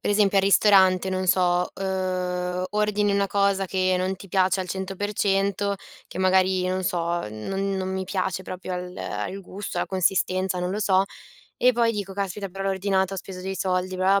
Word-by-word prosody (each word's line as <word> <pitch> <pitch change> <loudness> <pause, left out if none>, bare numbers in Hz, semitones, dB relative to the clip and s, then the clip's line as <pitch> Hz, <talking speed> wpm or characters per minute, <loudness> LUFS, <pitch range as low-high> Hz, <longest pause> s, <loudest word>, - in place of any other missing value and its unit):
per - - -1
esempio, 205 -1 +3
al - - +3
ristorante, 190 -2 +5
non 185 0 -1
so, 180 -1 +2
uhm, 185 -1 -2
ordini 210 -1 +1
una 200 0 +2
cosa 200 -1 +1
che 185 0 +1
non 185 +1 -1
ti 195 - -12
piace 185 +1 +2
al 185 - -5
100 190 +1 -4
per 205 +2 -2
100, 200 0 +1 0.3
che - - -8
magari, 185 0 +3
non 185 +1 -1
so, 175 -2 -1
non 195 - -3
non 190 0 -2
mi 190 0 -2
piace 190 -1 -2
proprio 185 0 -6
al 180 0 -6
al 105 - -4
gusto, 195 +2 -7
alla - - 0
consistenza, 185 0 +1
non 180 0 -2
lo 205 +3 -2
so, 190 -2 +3 0.5
e 250 +1 +4
poi 235 -1 +2
dico: 200 -3 -4
“Caspita, 195 0 -3
però 195 +1 -6
l'ho 195 - +1
ordinato, 190 0 0
ho - - -5
speso 185 0 -7
dei 190 +1 -4
soldi, 185 0 -1
bla 190 +2 +3
190 Hz, 200 wpm, -25 LUFS, 185-195 Hz, 0.5 s, ristorante